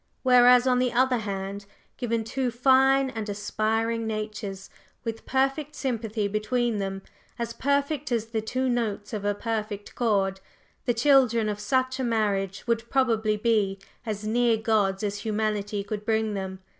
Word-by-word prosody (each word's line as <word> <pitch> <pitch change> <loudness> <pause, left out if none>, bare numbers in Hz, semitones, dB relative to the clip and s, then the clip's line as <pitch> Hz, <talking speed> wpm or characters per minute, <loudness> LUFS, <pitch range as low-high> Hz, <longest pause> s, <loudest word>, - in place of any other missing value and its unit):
Whereas 250 -1 +6
on 250 -1 +3
the 250 -1 +1
other 250 0 +2
hand, 200 -1 -5 0.3
given 230 -3 -1
two 250 +3 -1
fine 265 +2 +4
and 220 -3 -5
aspiring 220 +2 -1
natures 210 -3 -4 0.4
with 225 -2 -5
perfect 270 +3 0
sympathy 225 -5 -2
between 215 +2 0
them, 195 0 -4 0.3
as 235 0 -3
perfect 280 0 0
as 230 -2 +1
the 225 -1 -3
two 255 +4 -1
notes 230 -3 -2
of 210 -2 -3
a 205 0 +1
perfect 210 -2 -4
chord, 195 -5 +1 0.5
the 240 -2 +1
children 240 -3 +4
of 210 0 -3
such 260 +5 0
a - - 0
marriage 205 -5 -1
would 235 0 -1
probably 225 -5 +2
be 210 -3 +1 0.3
as 215 -3 -4
near 230 +1 +2
gods 215 -3 +1
as 205 0 -2
humanity 210 -2 -1
could 210 +1 -5
bring 220 0 0
them. 190 -1 -5
225 Hz, 155 wpm, -26 LUFS, 205-245 Hz, 0.5 s, Whereas